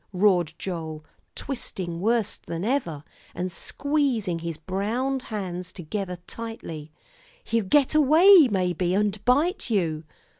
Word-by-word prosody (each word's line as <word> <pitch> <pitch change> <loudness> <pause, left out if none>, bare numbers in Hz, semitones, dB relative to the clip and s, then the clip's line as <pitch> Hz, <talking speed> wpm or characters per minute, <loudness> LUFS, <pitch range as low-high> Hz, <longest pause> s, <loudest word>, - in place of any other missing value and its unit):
roared 180 -4 +3
Joel, 160 -4 -5 0.3
twisting 180 -10 -4
worse 225 +2 +1
than 170 +3 -5
ever, 215 - -1 0.3
and 180 +1 -3
squeezing 250 - -1
his 165 -1 -5
brown 215 - -1
hands 185 -6 -5
together 180 +2 -4
tightly; 165 -10 -7 0.5
"he'll 230 -3 0
get 280 +8 +3
away, 315 +3 +7
maybe, 180 -2 0
and 205 0 0
bite 290 - +2
you." 165 -8 0
195 Hz, 115 wpm, -25 LUFS, 175-250 Hz, 0.5 s, away